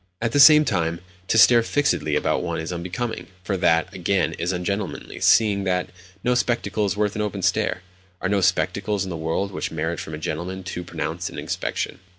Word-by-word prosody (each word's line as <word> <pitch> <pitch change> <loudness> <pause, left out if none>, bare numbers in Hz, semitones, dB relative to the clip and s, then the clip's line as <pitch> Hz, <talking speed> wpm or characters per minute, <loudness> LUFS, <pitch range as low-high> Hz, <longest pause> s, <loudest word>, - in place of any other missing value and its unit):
At 115 0 -1
the 145 - +2
same 150 +1 +9
time, 85 - -1 0.3
to - - +2
stare 120 +1 +7
fixedly 115 - 0
about - - +1
one - - -3
is 80 +2 -4
unbecoming; 95 +7 -4 0.2
for 95 - -2
that, 85 -2 +2
again, 90 -2 0
is 85 +2 -1
ungentlemanly, 95 +3 -4
seeing 105 -3 +4
that 90 -1 -1 0.3
no 125 - +2
spectacle 110 -4 0
is 100 - -2
worth 105 -1 0
an 105 - -2
open 100 -2 -3
stare—are 95 -1 -2
no 100 -1 +2
spectacles 95 +2 0
in 95 - -5
the - - -4
world 80 +5 -2
which - - -3
merit 80 +1 -3
from 80 - -6
a - - -6
gentleman 85 +5 -4
too 90 0 -5
pronounced 85 - -4
an - - -10
inspection. - - -3
95 Hz, 190 wpm, -23 LUFS, 85-105 Hz, 0.3 s, same